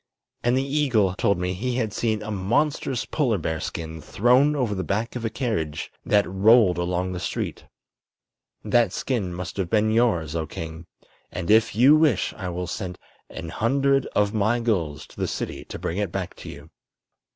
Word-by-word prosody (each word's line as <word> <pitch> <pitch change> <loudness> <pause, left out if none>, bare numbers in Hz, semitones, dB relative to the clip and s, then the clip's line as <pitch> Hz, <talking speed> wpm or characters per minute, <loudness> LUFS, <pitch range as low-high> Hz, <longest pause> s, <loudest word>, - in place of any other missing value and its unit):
And 120 +1 +2
the 135 - +1
eagle 130 -10 +2
told 100 +1 +1
me 90 +1 -1
he 120 +7 -2
had 110 -4 -1
seen 110 0 -1
a 110 - -5
monstrous 120 +6 0
polar 125 -9 0
bear 80 -2 -2
skin 80 0 -5
thrown 125 - +3
over 125 -7 0
the 95 -2 -2
back 110 +6 -2
of 120 - -4
a 115 - 0
carriage 110 - -3
that 100 -1 +3
rolled 95 -1 +4
along 90 +1 -1
the 90 - -4
street. - - -4 1.0
That 120 -6 +3
skin 110 -9 -2
must 90 +2 -6
have 95 -3 -1
been 110 0 +2
yours, 90 -10 +1
oh 80 -2 -2
king, 80 +2 -7 0.4
and 85 - -2
if 110 -2 +4
you 130 +7 +7
wish 155 - +2
I 95 -3 -5
will 90 +1 -3
sent 90 +1 -5 0.3
an 80 - -7
hundred 135 - +1
of 105 0 +2
my 110 +3 +2
gulls 85 -11 -1
to - - -19
the - - -1
city - - -4
to - - -7
bring 90 - -3
it 100 -4 -1
back 95 -1 -4
to - - -9
you." 75 +3 -11
105 Hz, 185 wpm, -24 LUFS, 90-120 Hz, 1.0 s, you